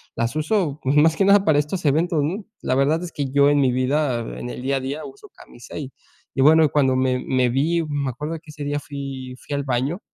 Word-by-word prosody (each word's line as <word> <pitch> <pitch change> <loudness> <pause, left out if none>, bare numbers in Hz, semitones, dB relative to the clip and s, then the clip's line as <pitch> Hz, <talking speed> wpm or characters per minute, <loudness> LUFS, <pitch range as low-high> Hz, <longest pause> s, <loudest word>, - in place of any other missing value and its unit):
las 115 +2 -1
uso 155 -2 0
más 150 +4 +4
que 195 - +3
nada 200 0 +6
para 155 -2 +4
estos 150 +5 -3
eventos, 155 +2 +2
¿no? 190 +8 -3 0.2
La - - -1
verdad 150 +5 +2
es 175 - -6
que 145 - -2
yo 140 +1 +4
en 145 0 +3
mi 130 -2 +3
vida, 130 0 0 0.2
en 120 - -6
el 125 - -7
día 135 +2 0
a - - -3
día, 140 +4 -5
uso 415 +1 -12
camisa 120 - -12
y 140 -3 -6 0.4
y, 135 - +1
bueno, 155 +1 +6
cuando 135 -3 +2
me 130 -1 +1
me 130 -1 +1
vi, 160 +7 +1
me 145 -2 -1
acuerdo 150 +6 -5
de - - -7
que 160 - -13
ese 150 -1 -8
día 145 0 -1
fui 135 -3 -7
fui 145 - -3
al 140 - -2
baño 135 +7 -1
145 Hz, 245 wpm, -22 LUFS, 130-155 Hz, 0.4 s, nada